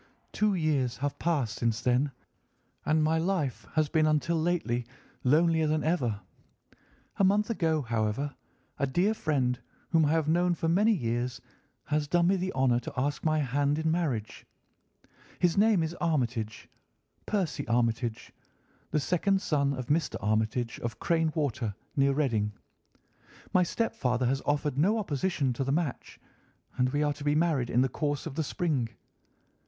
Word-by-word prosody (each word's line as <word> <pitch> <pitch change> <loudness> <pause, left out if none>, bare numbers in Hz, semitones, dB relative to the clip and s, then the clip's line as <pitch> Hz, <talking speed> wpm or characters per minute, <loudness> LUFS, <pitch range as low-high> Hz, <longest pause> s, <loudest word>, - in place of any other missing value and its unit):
"Two 210 -2 +1
years 145 -7 0
have 145 +1 -3
passed 140 -10 0
since 115 -2 0
then, 130 +3 +1 0.8
and 155 0 +3
my 160 +1 +2
life 165 -7 -1
has 155 -1 +2
been 155 0 +2
until 155 +2 +1
lately 160 -8 0 0.4
lonelier 160 +4 +3
than 155 0 +1
ever. 125 -11 0 1.0
A - - +2
month 205 +4 +3
ago, 160 -8 +1
however, 115 +4 -1 0.5
a 140 - +1
dear 180 +10 +2
friend, 130 - 0 0.3
whom 165 -2 +4
I - - +2
have 160 -1 +1
known 175 +2 +2
for 165 - -2
many 200 +7 +4
years, 120 - -1 0.4
has 150 -1 -1
done 170 +3 +3
me 195 - +4
the 185 0 -2
honour 130 -2 +2
to 120 - -8
ask 145 +3 -1
my 155 -1 +2
hand 145 +2 +1
in 160 0 0
marriage. 130 -11 -2 0.9
His 175 -2 +2
name 205 -4 +4
is 160 +1 -3
Armitage—Percy 135 - -3
Armitage—the 115 +5 -3
second 185 +6 +1
son 140 -7 +1
of 130 -1 -5
Mr. 150 +4 0
Armitage, 110 +3 -1
of 120 0 -4
Crane 165 -2 +1
Water, 120 - -1 0.2
near 140 -1 +3
Reading. 115 -8 0 1.0
My 185 - +5
stepfather 130 - 0
has 135 +2 +1
offered 145 -1 0
no 205 +8 +3
opposition 155 - -1
to 125 - -2
the 135 - -1
match, 155 -2 -2 0.6
and 125 0 +2
we 145 +3 0
are 145 -1 +1
to 145 +1 -10
be 145 0 +2
married 155 -6 +1
in 120 - +3
the 135 - +3
course 145 +2 -2
of - - -5
the 160 +3 -1
spring. 145 -6 -1
145 Hz, 155 wpm, -29 LUFS, 125-165 Hz, 1.0 s, My